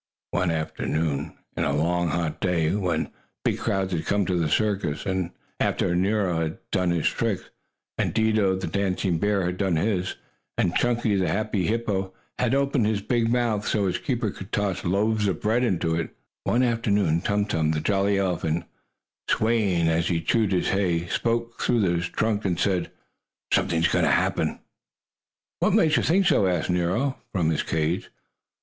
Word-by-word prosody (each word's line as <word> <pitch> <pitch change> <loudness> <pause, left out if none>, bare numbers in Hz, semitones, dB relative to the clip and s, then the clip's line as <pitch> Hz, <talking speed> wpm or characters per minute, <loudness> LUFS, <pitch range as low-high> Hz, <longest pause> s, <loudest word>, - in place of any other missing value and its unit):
One 90 - +1
afternoon 80 -1 -2 0.2
of - - 0
a 70 - +1
long 85 +3 +1
hot 85 0 -2
day, 85 -3 +1
when 90 -6 -1 0.3
big - - +1
crowds 95 -1 -1
had 80 - -2
come 100 -1 +2
to 90 - 0
the 85 -3 +1
circus, 100 -5 0
and 95 -2 -1 0.3
after 85 - +1
Nero 95 -2 +1
had 80 -1 -2
done 90 -1 +1
his 85 -3 0
tricks, - - -1 0.5
and - - +1
Dido, 110 -4 +2
the 95 - -3
dancing 95 -3 0
bear, 100 -1 +1
had 90 +1 -2
done 95 -3 +1
his, 95 +2 0 0.4
and 85 - +1
Chunky, 120 -4 +1
the 95 - +1
happy 110 -4 0
hippo, 105 -4 -1 0.3
had 125 +1 +2
opened 140 -5 +2
his 105 -2 -1
big 115 -1 +1
mouth 115 -4 0
so 105 -2 +1
his 90 - 0
keeper 120 -5 -1
could 95 +1 -10
toss 95 -2 -1
loaves 105 +3 +1
of 90 -5 -1
bread 115 +4 +1
into 90 -8 +1
it 80 0 -1 0.4
one 125 +2 +2
afternoon 105 -8 +1
Tum 100 +1 +1
Tum, 80 -7 0
the 80 -1 +1
jolly 100 +3 +1
elephant, 85 -3 -1 0.6
swaying 105 -7 +2
as 80 +1 +1
he 85 -2 +1
chewed 105 +4 +1
his 90 - +1
hay, 90 -4 +1
spoke 115 +2 -1
through 120 - +2
his 85 -2 0
trunk 110 -1 0
and 90 -3 -1
said: 95 -2 +1 0.6
"Something 85 -3 +2
is 85 - +4
going - - +2
to - - +3
happen!" - - +1 1.0
"What - - +2
makes 155 -1 +4
you - - +3
think 190 +4 +3
so?" 150 - +4
asked 90 -1 0
Nero, 90 +10 0
from 85 -5 +1
his 80 - 0
cage. 80 +3 -1
95 Hz, 175 wpm, -25 LUFS, 85-110 Hz, 1.0 s, is